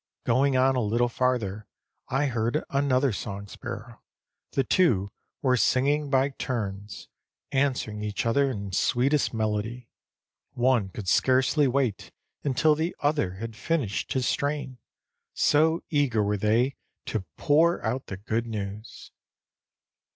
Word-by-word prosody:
Going 130 Hz, +3 st, +3 dB
on 130 Hz, +1 st, +3 dB
a 125 Hz, -, +1 dB
little 115 Hz, +3 st, +1 dB
farther 115 Hz, -5 st, -1 dB, 0.4 s
I 135 Hz, +3 st, +1 dB
heard 120 Hz, +2 st, 0 dB
another 140 Hz, -2 st, +2 dB
song 100 Hz, 0 st, -5 dB
sparrow; 115 Hz, +2 st, -8 dB, 0.5 s
the 135 Hz, -, +2 dB
two 110 Hz, -, +2 dB, 0.3 s
were 130 Hz, -2 st, +4 dB
singing 140 Hz, +4 st, +2 dB
by 135 Hz, 0 st, +3 dB
turns, 105 Hz, -7 st, -5 dB, 0.4 s
answering 130 Hz, -6 st, 0 dB
each 105 Hz, +1 st, -3 dB
other 140 Hz, +4 st, +2 dB
in 100 Hz, -6 st, -5 dB
sweetest 130 Hz, +9 st, +2 dB
melody. 110 Hz, +2 st, -2 dB, 0.6 s
One 120 Hz, -5 st, +2 dB
could 95 Hz, +1 st, -8 dB
scarcely 130 Hz, -, +3 dB
wait 125 Hz, -5 st, -1 dB, 0.3 s
until 150 Hz, +3 st, +3 dB
the 160 Hz, +3 st, -2 dB
other 145 Hz, -11 st, +1 dB
had 110 Hz, +3 st, -6 dB
finished 130 Hz, -8 st, -1 dB
his 130 Hz, -2 st, 0 dB
strain, 140 Hz, -3 st, -2 dB, 0.6 s
so 160 Hz, +3 st, +3 dB
eager 135 Hz, -8 st, +2 dB
were 105 Hz, 0 st, 0 dB
they 115 Hz, +6 st, +1 dB, 0.3 s
to 110 Hz, -4 st, -2 dB
pour 160 Hz, +2 st, +3 dB
out 125 Hz, +4 st, -2 dB
the 95 Hz, -, -6 dB
good 110 Hz, +4 st, -2 dB
news. 105 Hz, 0 st, -6 dB
125 Hz, 130 wpm, -26 LUFS, 105-140 Hz, 0.6 s, were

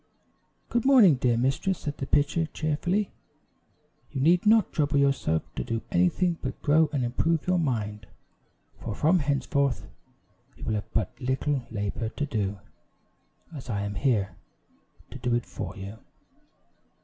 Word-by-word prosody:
"Good 240 Hz, -2 st, +1 dB
morning, 250 Hz, -, +7 dB
dear 125 Hz, -3 st, +1 dB
mistress," 135 Hz, +9 st, +1 dB
said 145 Hz, -1 st, -5 dB
the 135 Hz, -, -3 dB
pitcher, 150 Hz, +3 st, +2 dB
cheerfully; 175 Hz, +7 st, -1 dB, 1.0 s
"you -, -, -3 dB
need 175 Hz, +8 st, +4 dB
not 220 Hz, -1 st, +5 dB
trouble 145 Hz, -2 st, +1 dB
yourself 140 Hz, -, +2 dB
to -, -, -3 dB
do 115 Hz, -1 st, -3 dB
anything 165 Hz, -, +2 dB
but -, -, -4 dB
grow 155 Hz, +1 st, +4 dB
and 135 Hz, -5 st, 0 dB
improve 155 Hz, +6 st, 0 dB
your 180 Hz, 0 st, +2 dB
mind; 110 Hz, -8 st, -2 dB, 0.7 s
for 100 Hz, -, -5 dB
from 165 Hz, -, +3 dB
henceforth 140 Hz, -1 st, 0 dB, 0.7 s
you -, -, -11 dB
will -, -, -1 dB
have 105 Hz, -2 st, -4 dB
but 105 Hz, -5 st, 0 dB
little 130 Hz, 0 st, -1 dB
labor 110 Hz, +1 st, -3 dB
to 145 Hz, +5 st, -3 dB
do, 105 Hz, -7 st, -2 dB, 1.0 s
as 130 Hz, -3 st, -8 dB
I 100 Hz, -3 st, -1 dB
am 100 Hz, 0 st, -3 dB
here 100 Hz, -2 st, 0 dB, 0.8 s
to -, -, -8 dB
do 120 Hz, -1 st, +1 dB
it 120 Hz, -, -1 dB
for -, -, -6 dB
you." 100 Hz, +3 st, -8 dB
135 Hz, 150 wpm, -27 LUFS, 110-160 Hz, 1.0 s, morning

